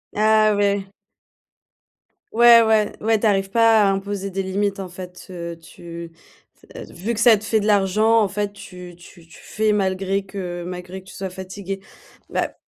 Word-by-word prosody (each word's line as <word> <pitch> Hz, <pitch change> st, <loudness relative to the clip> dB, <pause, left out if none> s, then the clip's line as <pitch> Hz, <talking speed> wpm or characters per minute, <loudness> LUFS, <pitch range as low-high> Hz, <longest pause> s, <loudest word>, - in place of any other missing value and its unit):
Ah 215 Hz, 0 st, +4 dB
ouais. 200 Hz, -1 st, 0 dB, 1.4 s
Ouais, 235 Hz, 0 st, +7 dB
ouais. 220 Hz, -2 st, +2 dB
Ouais, 220 Hz, 0 st, +2 dB
tu 225 Hz, -, -2 dB
arrives 195 Hz, -1 st, +1 dB
pas 225 Hz, -2 st, +5 dB
à 195 Hz, -, +3 dB
imposer 195 Hz, 0 st, -4 dB
des 195 Hz, +1 st, -2 dB
limites 195 Hz, +1 st, -2 dB
en 190 Hz, -, -5 dB
fait, 180 Hz, 0 st, -11 dB
heu, 170 Hz, -2 st, -7 dB
tu 170 Hz, 0 st, -10 dB, 0.4 s
c -, -, -24 dB
v -, -, -10 dB
vu 205 Hz, +8 st, -3 dB
que 220 Hz, -, -4 dB
ça 230 Hz, -2 st, +7 dB
te 210 Hz, -, -7 dB
fait 220 Hz, 0 st, +1 dB
de 205 Hz, -, -3 dB
l'argent, 215 Hz, +3 st, +3 dB
en 200 Hz, -, +1 dB
fait, 205 Hz, +1 st, -3 dB
tu 180 Hz, -3 st, -11 dB
tu 170 Hz, -1 st, -17 dB
tu 160 Hz, -, -16 dB
fais 215 Hz, 0 st, 0 dB
malgré 195 Hz, 0 st, -1 dB
que 180 Hz, -3 st, -6 dB
malgré 180 Hz, +1 st, -7 dB
que -, -, -23 dB
tu -, -, -12 dB
sois 190 Hz, -1 st, -5 dB
fatigué. 190 Hz, +1 st, -7 dB, 0.5 s
Bah, -, -, -2 dB
195 Hz, 185 wpm, -21 LUFS, 185-215 Hz, 1.4 s, Ouais